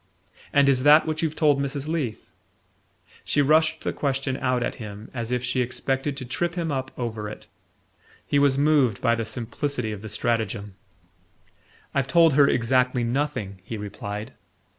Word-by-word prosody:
"And 140 -1 +4
is 135 -2 +3
THAT 150 +3 +7
what 155 0 -2
you've 160 -2 -1
told 145 -3 +3
Mrs. 140 +1 -3
Leath?" 150 -9 -3 0.9
She - - 0
rushed 155 +2 +3
the - - -1
question 135 -1 -1
out 125 -1 0
at - - -2
him 105 0 -8
as 115 -2 -4
if 125 0 0
she 125 +1 0
expected 135 +3 -2
to 130 - -5
trip 170 +7 -2
him 170 -3 -2
up 130 -1 -2
over 110 -4 -4
it. - - -10 0.8
He 145 - +2
was 140 -1 +3
moved 140 -7 +3
by 115 -2 +2
the 115 -1 -1
simplicity 120 +1 -3
of 105 -2 -6
the 110 - -7
stratagem. 105 -2 -1 1.2
"I've 135 -1 0
told 165 +1 +5
her 140 0 +6
exactly 125 0 +2
nothing," 120 -6 -2
he 110 - -6
replied. 105 +3 -6
130 Hz, 165 wpm, -25 LUFS, 115-145 Hz, 1.2 s, THAT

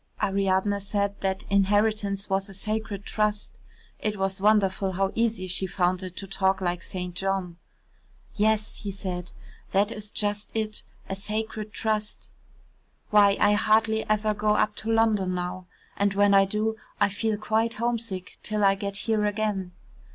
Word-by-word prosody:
Ariadne 195 +1 +1
said 200 0 -2
that 190 -1 -1
inheritance 200 0 +2
was 195 +1 0
a 195 - -7
sacred 215 -1 -3
trust 210 -1 -1 0.4
(it 210 -1 -1
was 195 0 -1
wonderful 195 -2 +3
how 195 +1 0
easy 225 -4 0
she 185 +1 0
found 180 0 +1
it 185 -1 -7
to 195 - -5
talk 190 0 +1
like 175 -1 -1
St. 180 -1 -5
John). 185 -2 -2 0.8
"Yes," 215 0 +1
he 205 - -5
said, 185 -2 -4 0.4
"that 205 +3 +3
is 210 -1 -6
just 205 0 -1
it 215 -1 -1 0.3
a - - -3
sacred 215 +2 -3
trust. 215 -1 -2 0.8
Why, 205 -1 +6
I 205 - +5
hardly 220 +1 +3
ever 215 0 +2
go 210 0 +1
up 210 0 +1
to 225 - -2
London 215 -5 +2
now, 180 +1 -4 0.3
and 200 -1 +1
when 205 0 +4
I 195 0 +7
do, 215 +3 -1 0.2
I 205 - +5
feel 210 +2 -1
quite 220 +2 0
homesick 230 -5 -3
till 215 -1 0
I 195 0 +6
get 200 0 -4
here 220 -2 +2
again." 205 -3 -1
205 Hz, 160 wpm, -26 LUFS, 195-215 Hz, 0.8 s, I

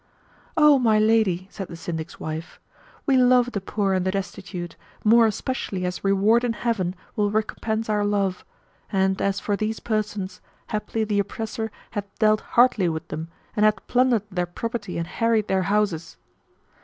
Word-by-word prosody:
"O 300 -3 +7
my 225 -4 +4
lady," 215 -4 +3
said 195 -3 -6
the - - -8
Syndic's 165 -1 -6
wife, 155 +1 -6 0.5
"we 270 -2 +4
love 250 -1 +5
the 200 - -3
poor 195 0 0
and 185 -1 +1
the 185 - 0
destitute, 185 -2 -5 0.3
more 230 +1 +6
especially 205 -4 -3
as 180 0 -4
reward 200 +4 +3
in 240 -2 +1
Heaven 205 -6 -1 0.2
will 205 -1 +2
recompense 220 +1 -1
our 210 -1 +1
love; 200 -3 0 0.5
and, 190 -1 +1
as 200 0 +1
for 205 0 -1
these 215 +1 -2
persons, 210 -4 -3 0.3
haply 215 +1 -2
the 210 -1 0
oppressor 220 +2 -3 0.2
hath 205 -1 -3
dealt 215 -1 +3 0.2
hardly 230 -7 +5
with 160 -1 -5
them; 160 +1 -4 0.3
and 210 - +2
hath 215 0 +3
plundered 245 -4 +3
their 180 -1 -1
property 210 +1 -4
and 170 - -1
harried 225 +3 +1
their 190 0 +2
houses." 200 -6 0
205 Hz, 165 wpm, -24 LUFS, 185-225 Hz, 0.5 s, O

